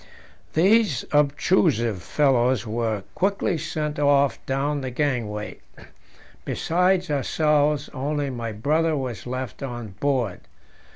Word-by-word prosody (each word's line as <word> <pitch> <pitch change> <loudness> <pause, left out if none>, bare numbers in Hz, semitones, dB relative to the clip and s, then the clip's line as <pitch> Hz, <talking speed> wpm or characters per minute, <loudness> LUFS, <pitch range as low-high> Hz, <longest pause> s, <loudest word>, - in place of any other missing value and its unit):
These 190 - +3
obtrusive 140 - +2
fellows 130 - +2
were 110 -2 -2
quickly 190 -3 0
sent 150 -1 -3
off 140 -1 +3
down 140 +2 -1
the 130 - -3
gangway: 120 -6 -2 0.8
besides 180 0 +1
ourselves 150 +1 +1
only 145 +1 -2
my 115 -2 -4
brother 155 +9 +1
was 125 -6 -5
left 130 +1 -5
on 120 -5 -5
board. 130 -9 0
140 Hz, 105 wpm, -24 LUFS, 120-150 Hz, 0.8 s, These